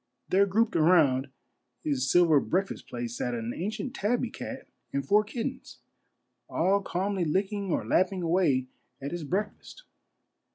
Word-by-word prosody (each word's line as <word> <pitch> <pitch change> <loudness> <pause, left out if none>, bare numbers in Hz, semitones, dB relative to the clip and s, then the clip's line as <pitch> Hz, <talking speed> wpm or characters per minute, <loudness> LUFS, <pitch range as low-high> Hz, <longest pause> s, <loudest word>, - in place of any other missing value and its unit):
There 200 +2 +4
grouped 220 +5 +1
around 155 -5 +4 0.5
his 135 -3 0
sil 175 0 +6
ver 155 -4 +5
breakfast 190 +7 -2
plate 120 -1 -5
sat 120 0 -2
an 115 0 -3
ancient 215 +8 -4
tabby 240 +2 0
cat 265 -1 -7 0.2
and 140 -1 -2
four 210 +5 +5
kittens, 250 +4 -5 0.7
all 195 +4 +2
calmly 190 0 -1
licking 195 +4 -1
or - - 0
lapping 185 0 +1
away 165 -7 +2 0.3
at 140 +1 -5
his 175 -2 -4
breakfast. 205 - -4
185 Hz, 140 wpm, -28 LUFS, 145-205 Hz, 0.7 s, sil